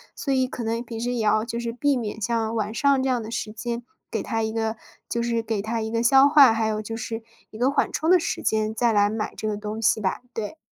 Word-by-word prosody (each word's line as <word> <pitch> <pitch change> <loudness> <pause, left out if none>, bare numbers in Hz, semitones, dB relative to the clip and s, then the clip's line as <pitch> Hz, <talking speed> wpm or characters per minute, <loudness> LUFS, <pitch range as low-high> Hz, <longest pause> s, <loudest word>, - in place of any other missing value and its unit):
所 275 - -1
以 260 -1 +2
可 245 - -6
能 230 +1 -1
平 225 -1 -7
时 245 +1 -1
也 235 -3 -1
要 215 +1 +2
就 235 0 -4
是 235 -1 -3
避 280 +4 +1
免 220 -2 -4
像 225 +1 -1
晚 215 0 -1
上 280 +1 +3
这 - - 0
样 250 -2 +1
的 220 - -7
时 215 -2 -4
间， 235 +1 -4 0.3
给 - - -2
它 225 0 -1
一 220 - -1
个 220 0 -1 0.3
就 235 - -1
是 235 -1 0
给 220 -3 -2
它 225 +2 -2
一 220 0 -3
个 230 - 0
消 270 +3 +6
化， 285 -4 +7
还 225 0 0
有 215 0 -1
就 225 +1 -5
是 225 0 -4 0.3
一 215 - -10
个 250 +3 +2
缓 280 - +1
冲 320 +2 -1
的 365 -1 +7
时 - - -3
间， 215 0 0
再 235 +1 +2
来 205 -1 +3
买 220 -1 -3
这 215 - -3
个 210 - -1
东 210 +1 -5
西 220 0 +2
吧， 190 +4 -1
对。 225 +7 -5
225 Hz, 290 characters per minute, -24 LUFS, 220-240 Hz, 0.3 s, 化